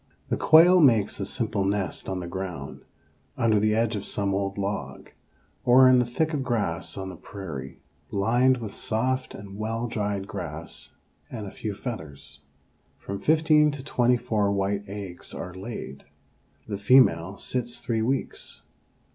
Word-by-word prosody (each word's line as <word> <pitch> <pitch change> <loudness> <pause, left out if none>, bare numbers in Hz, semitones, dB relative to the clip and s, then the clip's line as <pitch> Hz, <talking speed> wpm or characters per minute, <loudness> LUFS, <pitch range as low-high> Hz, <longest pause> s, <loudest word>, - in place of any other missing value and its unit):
The - - +1
quail 175 +3 +7
makes 115 -9 +4
a 95 - -3
simple 110 -4 -1
nest 95 -3 -2
on 95 -1 -2
the 85 - -5
ground, 95 -1 -6 0.5
under 115 -4 +3
the 105 +1 +2
edge 115 0 +1
of 100 - -4
some 100 -1 -1
old 100 0 -1
log, 100 +1 -4 0.5
or 130 +1 +7
in 130 -1 +6
the 125 - +1
thick 155 +6 0
grass 100 -10 -2
on 95 -1 -4
the 90 - -8
prairie, 80 -9 -8 0.3
lined 120 +6 +3
with 110 -4 -6
soft 130 +4 -1
and 100 0 -9
well 115 +2 -2
dried 100 -3 -2
grass 85 -5 -7 0.3
and 110 -4 -6
a 100 - -7
few 105 -2 -5
feathers. 75 - -5 0.6
From 100 0 -6
fifteen 155 +4 +4
to 145 -2 -6
twenty 125 -3 +2
four 110 -4 0
white 100 +1 -1
eggs 100 -3 -7
are 90 - -6
laid. 95 - -7 0.6
The 100 -2 -4
female 100 -6 +4
sits 120 -1 -3
three 115 -2 -1
weeks. 130 +4 -2
105 Hz, 155 wpm, -26 LUFS, 95-120 Hz, 0.6 s, quail